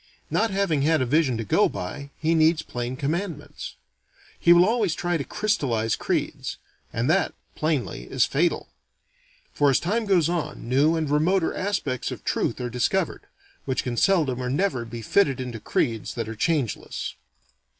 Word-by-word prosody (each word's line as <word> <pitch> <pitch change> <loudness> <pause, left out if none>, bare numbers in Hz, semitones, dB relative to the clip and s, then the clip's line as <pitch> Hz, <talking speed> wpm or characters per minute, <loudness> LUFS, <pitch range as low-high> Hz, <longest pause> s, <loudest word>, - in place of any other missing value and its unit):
Not 225 - +2
having 195 -7 +1
had 160 +3 +3
a 130 - +1
vision 135 -2 +2
to 115 - -2
go 100 - +3
by, 140 +11 -6
he 160 +1 +1
needs 160 0 +3
plain 120 +1 -4
commandments. 150 0 -4 0.6
He 170 - +5
will 175 +1 +8
always 215 -5 +1
try 175 0 -1
to 150 - -1
crystallize 125 - 0
creeds. - - -2 0.3
And 115 +2 -1
that, 175 +3 +2 0.2
plainly, 155 -4 -1
is 130 -2 +2
fatal. 165 +5 0 0.8
For 145 - +3
as 135 - +4
time 215 +5 -1
goes 180 -6 +4
on, 160 -7 -3
new 140 +6 +3
and 160 -2 -1
remoter 160 +5 +2
aspects 180 - -2
of - - -7
truth - - -1
are 125 - -2
discovered, 125 -2 0 0.4
which 130 -1 -1
can 125 -2 -3
seldom 150 - +2
or 125 - -2
never 140 -4 0
be 115 0 -7
fitted 140 - +2
into 125 -3 -5
creeds 115 0 -1
that 115 -3 -3
are 110 - -5
changeless. 140 -1 -1
150 Hz, 165 wpm, -25 LUFS, 125-175 Hz, 0.8 s, will